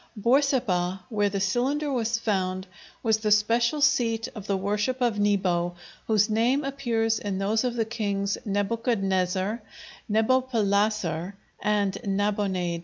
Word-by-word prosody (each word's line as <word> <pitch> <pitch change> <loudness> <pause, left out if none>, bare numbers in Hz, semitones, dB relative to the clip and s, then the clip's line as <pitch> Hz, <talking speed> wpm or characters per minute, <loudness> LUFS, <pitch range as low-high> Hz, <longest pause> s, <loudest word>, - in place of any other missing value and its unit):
Borsippa, 210 -7 +1
where 205 -2 +1
the 195 0 -2
cylinder 265 +9 0
was 230 -2 0
found, 185 -4 -1 0.4
was 220 -2 +3
the 215 -1 -1
special 230 +7 +2
seat 230 -6 +2
of 210 -4 -9
the 195 - +1
worship 205 +6 -1
of 235 -4 +1
Nebo, 185 -4 +1 0.3
whose 215 -2 +3
name 240 +6 +2
appears 230 -5 0
in 200 -2 -3
those 210 +4 +1
of 245 -1 -1
the 225 -2 0
kings 200 -3 -1
Nebuchadnezzar, 200 -1 0 0.5
Nebopalasser, 210 -6 +1 0.3
and 205 -2 0
Nabonaid. 195 -4 -1
210 Hz, 125 wpm, -26 LUFS, 195-235 Hz, 0.5 s, was